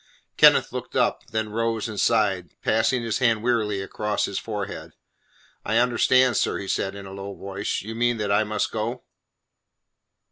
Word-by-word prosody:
Kenneth - - +6
looked - - -6
up, - - +1
then 110 -1 -2
rose 115 0 -1
and 105 -3 -5
sighed, 100 -7 +1
passing 115 +3 +2
his 115 0 -1
hand 115 -4 +2
wearily 110 -5 0
across 105 +2 -2
his 100 - -3
forehead. 105 -3 -6 0.7
"I 110 +2 0
understand, 125 0 +3
sir," - - +1
he - - -5
replied 95 0 -2
in 100 -1 -8
a 95 - -9
low 100 0 -7
voice. 100 0 -4
"You 110 +2 -6
mean 120 +1 +1
that 105 -2 -2
I 105 +2 +3
must 105 0 -2
go?" 115 +3 -3
110 Hz, 170 wpm, -24 LUFS, 100-115 Hz, 0.7 s, Kenneth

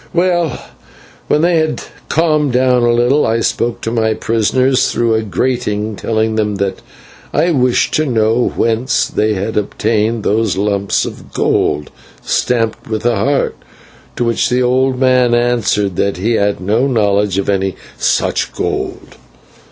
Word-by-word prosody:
"Well, 175 -5 +1 0.7
when 150 - +2
they 175 0 +3
had 155 -1 -1 0.3
calmed 155 -4 +1
down 125 0 +3
a 120 0 +3
little, 120 +5 +2
I 115 +1 +1
spoke 115 +1 -1
to 115 - -3
my 110 -2 +1
prisoners 125 +4 +1
through 115 -1 +1
a 110 - +1
grating, 110 -1 -2
telling 110 +1 -1
them 105 -1 0
that 100 0 -2 0.5
I 175 - +2
wished 125 -5 +1
to 155 - +1
know 115 0 +1
whence 115 +3 +1
they 110 0 0
had 100 +4 -3
obtained 110 +1 0
those 110 -2 0
lumps 100 -1 0
of - - -9
gold 75 0 0 0.3
stamped 115 -3 -1
with 110 0 -3
a 120 -1 +2
heart, 135 +8 0 0.6
to - - -1
which 115 -1 +1
the 125 +1 +1
old 130 +1 +1
man 125 -2 +3
answered 115 -6 0
that 100 -2 0
he 105 +6 -1
had 100 -3 +1
no 110 +8 +1
knowledge 105 -5 +1
of 100 - -1
any 95 -2 0 0.2
such - - 0
gold. - - -4
115 Hz, 150 wpm, -15 LUFS, 105-125 Hz, 0.7 s, they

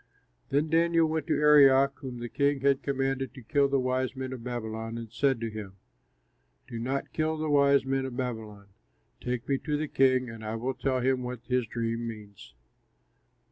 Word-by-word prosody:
Then 145 +3 +1
Daniel 165 +1 +3
went 160 +1 -2
to 155 - +2
Arioch, 140 -2 +6
whom 130 -2 -7
the 120 0 -5
king 140 +2 0
had 140 0 +2
commanded 135 -1 -2
to 130 - -11
kill 140 +4 +2
the 140 0 +1
wise 130 0 -1
men 130 0 -5
of 125 -3 -8
Babylon, 115 -2 -4
and 115 -2 -8
said 135 -4 +1
to 115 - -2
him, 105 -3 -7 0.9
"Do 115 - -6
not 130 +4 -3
kill 160 0 0
the 155 -1 -2
wise 140 -1 +4
men 135 0 0
of 125 -2 -8
Babylon. 110 -5 -5 0.5
Take 125 -1 -3
me 135 -1 +1
to 150 -2 -2
the 155 +1 -2
king, 130 -2 +3
and 115 -1 -9
I 110 +1 -3
will 125 +4 -2
tell 130 -1 -1
him 130 0 +1
what 125 -1 -5
his 125 -2 0
dream 115 0 -3
means." 105 -9 -10
130 Hz, 190 wpm, -28 LUFS, 115-140 Hz, 0.9 s, Arioch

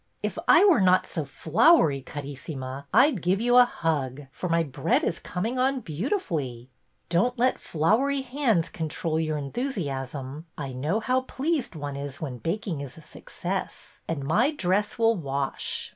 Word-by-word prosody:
If - - -2
I - - +7
were 345 - +5
not 185 0 +4
so 160 - -3
floury, 155 - +4
Carissima, 140 -1 -7
I 265 +9 +6
'd 205 - -5
give 185 +3 +1
you 245 +2 +4
a 250 - +9
hug, 145 - -2
for 180 - -5
my 165 0 +3
bread 155 +3 0
is 170 - -1
coming 225 +8 -3
on 265 0 +1
beautifully." 155 - -3 0.2
'' - - -45
Don't 200 +9 +2
let 255 +2 +2
floury 240 - +1
hands 250 - +1
control 160 0 -2
your 155 -1 -1
enthusi 205 - -3
asm; 135 +2 -5
I 135 -3 -5
know 155 - -1
how 255 +3 +1
pleased 270 - -2
one 145 -2 -5
is 140 -1 -6
when 135 -7 -5
baking 165 - -3
is 140 0 -8
a - - -11
success. - - -6
And 155 -4 -3
my 240 - +3
dress 205 - 0
will 230 0 +4
wash." 140 -5 -3
165 Hz, 170 wpm, -26 LUFS, -, 0.2 s, a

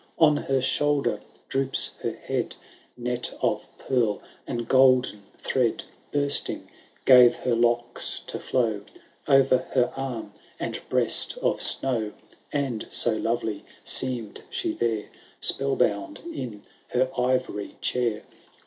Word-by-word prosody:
On 155 -2 +6
her 135 -2 0
shoulder 145 +1 +1 0.3
droops 135 0 +2
her - - -2
head; - - -3 0.4
Net 125 0 -3
of - - 0
pearl 120 -6 0 0.3
and 120 -3 -3
golden 130 -5 +4 0.2
thread. 125 -4 0 0.3
Bursting, 145 -1 -1 0.4
gave 125 -2 +8
her 125 - -1
locks 120 +1 +2
to - - -3
flow 115 -5 0 0.5
O'er 135 0 +7
her 130 -1 +1
arm 125 -6 -5 0.3
and - - -3
breast - - +2
of - - +1
snow. 115 -6 +2 0.4
And 135 -6 -2
so 115 -2 +2
lovely 110 -1 -2 0.2
seem'd 125 -5 0
she 360 -3 -2
there, 110 - -1 0.3
Spell 135 0 0
bound 100 -5 0
in 110 - -6 0.2
her 130 +1 +1
ivory 125 -5 -1
chair. 120 -4 -1
125 Hz, 120 wpm, -26 LUFS, 115-135 Hz, 0.5 s, gave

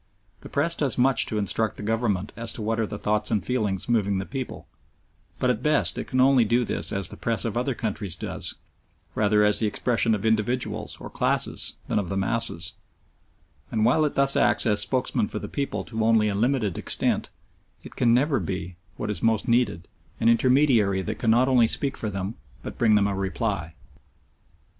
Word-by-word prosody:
The - - -12
Press 160 +4 +1
does 145 -5 0
much 125 -2 +3
to 110 - -2
instruct 105 +2 -1
the - - -7
Government 105 -3 -1
as 115 0 -1
to - - -6
what 110 +1 -1
are 110 - 0
the 105 - -6
thoughts 105 +1 -1
and 110 -3 0
feelings 105 -7 -1
moving 100 -5 +1
the 95 - -3
people, 130 +1 -6 0.7
but 125 - +2
at 115 -1 -3
best 150 +1 +2
it - - -4
can 130 - -1
only 130 -1 +5
do 120 +3 +1
this - - -2
as 100 -3 +2
the - - -10
Press 115 -2 -1
of 115 -2 -3
other 125 +2 -1
countries 105 -6 -3
does, - - -4 0.6
rather 105 0 +2
as 105 0 +2
the 110 - +1
expression 115 +1 +1
of 105 +1 -5
individuals 110 +3 -1
or - - -9
classes - - 0
than - - 0
of 95 - -4
the 95 - -2
masses, 95 -4 +1 1.0
and 110 -1 0
while 130 +6 +3
it 150 - -1
thus 140 0 +4
acts - - +2
as 105 -2 +3
spokesman 125 -2 0
for 105 - -6
the - - -5
people 140 -1 -3
to 110 -1 -3
only 110 -1 +3
a - - -1
limited 110 -3 0
extent, - - -1 0.5
it - - -12
can 120 - +2
never 135 +4 +2
be, 90 -2 -5 0.2
what 105 - -3
is 105 - -1
most 115 -2 +1
needed, 115 -8 +1 0.3
an 115 - +3
intermediary 115 -6 +3
that - - -5
can 115 - 0
not 120 +3 +4
only 125 -4 +4
speak 140 +4 0
for 110 - -4
them 95 +1 -4 0.3
but - - -7
bring 110 -3 +4
them 105 -1 +3
a 100 - 0
reply. 95 -3 -3
110 Hz, 200 wpm, -25 LUFS, 105-125 Hz, 1.0 s, only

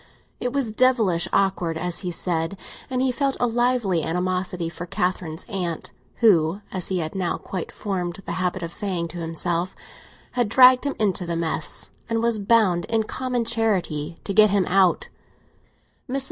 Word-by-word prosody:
It 245 - -2
was 270 -5 -1
devilish 220 -8 +2
awkward, 180 -4 +1
as 175 +1 -2
he 180 - -4
said, 170 +1 -2 0.3
and 255 0 0
he 260 - +2
felt 275 +1 0
a - - +3
lively 240 -6 +1
animosity 180 +1 -2
for 170 +1 -7
Catherine's 175 -2 -2
aunt, 180 -7 -3 0.3
who, 180 -4 +4
as 185 -2 -2
he 190 - -1
had 160 -2 -2
now 185 -3 -1
quite 185 -4 -5
formed 180 -3 -3
the - - -4
habit 185 0 -1
of 170 0 -5
saying 180 -5 -1
to 175 - -7
himself, 170 +2 -1 0.6
had 240 -4 0
dragged 255 +3 +7
him 280 - -1
into 195 -4 0
the 170 - -1
mess 165 -1 -2 0.2
and 230 0 0
was 230 -2 +1
bound 200 -5 +3
in 225 -1 +1
common 250 +1 -2
charity 180 -9 0
to 200 - -3
get 215 +1 +6
him 200 -2 +2
out 185 -2 +3
of - - -20
it. 255 - -18
Mrs. 275 - +1
190 Hz, 175 wpm, -23 LUFS, 175-230 Hz, 0.6 s, dragged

